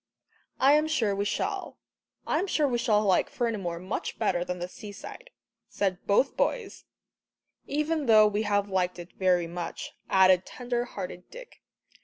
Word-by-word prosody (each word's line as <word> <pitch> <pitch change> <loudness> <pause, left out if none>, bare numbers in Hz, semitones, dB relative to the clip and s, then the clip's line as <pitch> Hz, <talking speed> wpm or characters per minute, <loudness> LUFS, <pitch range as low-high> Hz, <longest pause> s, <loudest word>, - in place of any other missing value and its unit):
"I 275 +2 +6
am 305 +1 +3
sure 230 -10 +1
we 200 +1 -1
shall. - - -3 0.5
I - - +1
am 390 - -1
sure 305 -5 +2
we 240 -3 0
shall 215 -3 +2
like 190 -3 +2
Fernimoor 205 -8 -2
much 185 +5 -4
better 185 -6 +1
than 180 0 -4
the 175 0 -4
seaside," 210 - -10 0.4
said 190 -2 -2
both 205 +7 +3
boys 450 -5 -2 0.8
"even 300 0 -1
though 215 -1 +7
we 210 0 +1
have 205 -1 +1
liked 185 -2 -1
it 175 0 -10
very 180 -2 +2
much," 170 0 -6 0.2
added 185 -1 +5
tender 245 +1 -3
hearted 180 -5 -7
Dick. - - -12
205 Hz, 160 wpm, -28 LUFS, 185-250 Hz, 0.8 s, though